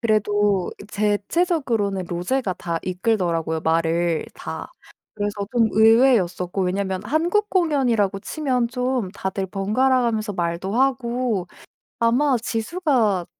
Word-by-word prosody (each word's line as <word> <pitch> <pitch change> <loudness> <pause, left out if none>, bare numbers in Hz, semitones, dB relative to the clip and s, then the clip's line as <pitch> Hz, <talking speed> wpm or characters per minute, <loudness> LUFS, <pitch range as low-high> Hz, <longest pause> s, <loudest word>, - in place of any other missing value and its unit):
그래도 205 -4 +1 0.2
대체적으로는 210 - 0
로제가 185 +4 -1
다 170 -1 -3
이끌더라고요 180 -5 -1
말을 165 +1 +1
다. - - -7 0.4
그래서 205 -1 -3
좀 230 -2 +3
의외였었고 220 -5 +3
왜냐면 190 0 -1
한국 345 - +1
공연이라고 250 - +1
치면 255 -3 -1
좀 250 -5 -1
다들 190 -1 -3
번갈아 230 +8 +1
가면서 220 -3 -1
말도 175 +2 -2
하고 245 -5 0 0.5
아마 250 +3 +3
지수가 225 - 0
215 Hz, 275 characters per minute, -22 LUFS, 190-250 Hz, 0.5 s, 좀